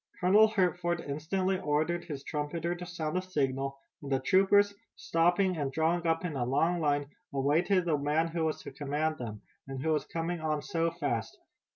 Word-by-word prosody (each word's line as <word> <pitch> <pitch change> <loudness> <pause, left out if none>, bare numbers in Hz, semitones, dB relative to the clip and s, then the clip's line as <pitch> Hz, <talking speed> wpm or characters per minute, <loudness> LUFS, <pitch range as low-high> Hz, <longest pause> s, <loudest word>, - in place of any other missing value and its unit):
Colonel 205 +5 +6
Hertford 180 -4 0
instantly 185 +6 -1
ordered 160 +1 0
his 140 -3 -6
trumpeter 160 +4 -2
to 175 0 -7
sound 165 0 -2
a - - -4
signal, 135 -6 -1 0.2
and 140 - -7
the 135 - +3
troopers, 195 +7 +4 0.2
stopping 175 +2 +2
and 140 -3 -1
drawing 165 +3 +1
up 165 +2 +1
in 165 -5 -3
a 130 - 0
long 165 +8 +1
line, 145 -2 +1 0.3
awaited 165 +7 +2
the 155 -4 +1
man 150 +3 +1
who 165 -1 -1
was 155 - -2
to - - -7
command 150 +3 -2
them, 110 -4 -6 0.2
and 135 -1 -5
who 160 - 0
was 150 -2 0
coming 165 +1 -3
on 155 -2 -1
so 165 0 0
fast. 145 -9 -3
160 Hz, 185 wpm, -30 LUFS, 145-175 Hz, 0.3 s, Colonel